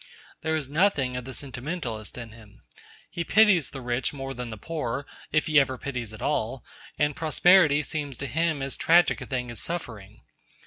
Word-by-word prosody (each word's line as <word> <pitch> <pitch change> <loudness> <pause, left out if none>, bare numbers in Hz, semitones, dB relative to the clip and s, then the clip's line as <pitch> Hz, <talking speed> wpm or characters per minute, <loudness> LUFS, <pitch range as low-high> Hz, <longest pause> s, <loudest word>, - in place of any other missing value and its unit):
There 160 0 0
is 150 -4 -2
nothing 145 -5 +2
of 125 -1 -4
the 130 - -7
sentimentalist 125 -5 -5
in 115 -2 -7
him. 110 -2 -16 0.5
He 170 - -2
pities 195 - +5
the 135 - -8
rich 125 +2 -1
more 135 -1 -5
than 125 -2 -6
the 110 - -7
poor, 140 0 -3 0.3
if 155 0 +2
he 155 -2 +5
ever 130 -2 +1
pities 125 -5 -4
at 110 - -9
all, 130 -4 -1 0.3
and 145 -1 +1
prosperity 160 -1 +5
seems 145 -4 -4
to 140 - -4
him 155 +2 0
as 135 - -2
tragic 170 +2 +4
a - - -7
thing 125 -3 -3
as 120 - -3
suffering. 110 - -6
135 Hz, 185 wpm, -26 LUFS, 120-155 Hz, 0.5 s, pities